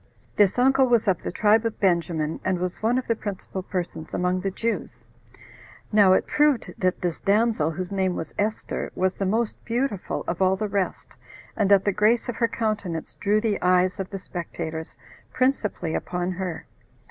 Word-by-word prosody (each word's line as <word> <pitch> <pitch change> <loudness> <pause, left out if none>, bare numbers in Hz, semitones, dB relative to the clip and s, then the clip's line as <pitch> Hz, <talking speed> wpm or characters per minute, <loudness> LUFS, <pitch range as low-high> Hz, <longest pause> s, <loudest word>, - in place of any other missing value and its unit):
This 205 0 +3
uncle 265 +1 +4
was 235 -3 +3
of 185 -4 +2
the - - -4
tribe 215 +4 +3
of 230 -1 -3
Benjamin, 170 -4 +1
and 185 -1 +1
was 180 0 -4
one 230 +3 +2
of 255 - -1
the 230 - +1
principal 195 -3 -5
persons 180 -3 -5
among 180 +1 0
the 195 - -1
Jews. 230 +4 -3 0.9
Now 205 -3 +6
it - - +2
proved 295 -5 +2
that 185 -2 0
this 175 -3 -2
damsel, 210 -5 +2
whose 180 +3 -4
name 190 -2 0
was 160 - -5
Esther, 215 +2 -2
was 185 0 +1
the 195 - -2
most 225 +3 -1
beautiful 235 -4 -2
of 175 +2 -2
all 190 0 +4
the 215 +2 -2
rest, 200 -2 -3 0.4
and 205 -3 +1
that 200 -1 +5
the 205 - +3
grace 215 +4 +2
of 245 - -4
her 230 - +3
countenance 210 -8 -3
drew 210 +1 +1
the 215 -2 -1
eyes 180 +1 +3
of 190 - -3
the 195 - -5
spectators 160 -3 -6 0.4
principally 215 -10 0
upon 180 0 -2
her. 180 -2 -4
195 Hz, 180 wpm, -25 LUFS, 180-220 Hz, 0.9 s, Now